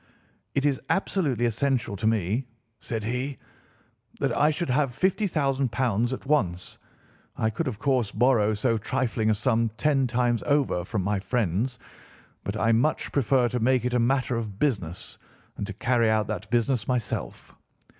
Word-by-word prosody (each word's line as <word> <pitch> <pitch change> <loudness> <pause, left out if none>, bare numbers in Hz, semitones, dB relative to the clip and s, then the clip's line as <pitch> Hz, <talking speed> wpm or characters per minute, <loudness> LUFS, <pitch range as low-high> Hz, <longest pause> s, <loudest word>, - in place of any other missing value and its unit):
"'It 140 - +1
is 140 -2 +1
absolutely 150 - +1
essential 120 -1 0
to 105 +3 -1
me,' 110 +4 0 0.3
said 115 -2 -4
he, 125 +5 -2 0.8
'that - - 0
I 150 - +4
should 155 -2 -1
have 140 +1 +2
£ - - -11
50,000 145 - +1 0.4
at 130 - -5
once. 95 - 0 0.6
I 110 0 +1
could, 150 +8 -2
of 120 -5 -3
course, 125 -3 +1
borrow 110 -3 +3
so 110 +2 +1
trifling 115 -1 0
a 110 - +3
sum 115 0 +1
ten 140 -3 +2
times 120 -1 +1
over 140 -11 +2
from 95 +1 -2
my 100 +1 0
friends, 110 +3 -1 0.7
but 100 +2 -3
I 110 +1 +2
much 120 +7 +1
prefer 130 -2 +3
to 125 - -2
make 125 +1 +2
it 125 - 0
a 125 - +3
matter 125 +1 +1
of 110 -4 -4
business 100 - -2 0.4
and 100 - -3
to 105 - -5
carry 115 +2 +2
out 110 -1 +2
that 105 +1 -5
business 120 -1 +1
myself. 115 - -3
120 Hz, 165 wpm, -26 LUFS, 110-135 Hz, 0.8 s, I